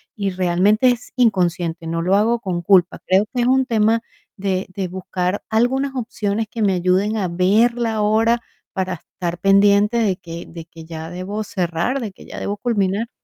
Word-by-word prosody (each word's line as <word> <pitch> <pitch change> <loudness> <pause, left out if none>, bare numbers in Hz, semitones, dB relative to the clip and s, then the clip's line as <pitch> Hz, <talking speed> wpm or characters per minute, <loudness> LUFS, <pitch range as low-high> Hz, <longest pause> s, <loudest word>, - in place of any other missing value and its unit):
y 200 -2 -1
realmente 185 +6 +3
es 245 0 -5
inconsciente, 175 -8 +1
no 165 0 -2
lo 185 +2 +3
hago 225 +3 +2
con 180 -5 -2
culpa. 180 0 +3
Creo 190 +3 +4
que 250 - 0
es 240 - +2
un 265 +1 +3
tema 225 -2 +2 0.4
de 190 -1 -2
de 190 0 -4
buscar 185 +1 -3
algunas 265 +5 +1
opciones 220 -3 -2
que 225 - -5
me 200 -2 +3
ayuden 185 +4 +1
a 190 - 0
ver 195 +7 +3
la 230 -3 -1
hora 225 +3 +3 0.3
para 185 -1 -2
estar 175 -1 -5
pendiente 200 +3 +4
de 210 -5 +2
que 170 -1 -8
de 165 -1 -9
que 165 -1 -13
ya 160 0 -7
debo 185 +5 -4
cerrar, 180 +6 -1
de 225 -5 -5
que 190 - -16
ya - - -7
debo 200 - -3
culminar. 210 -1 0
200 Hz, 185 wpm, -20 LUFS, 180-225 Hz, 0.4 s, Creo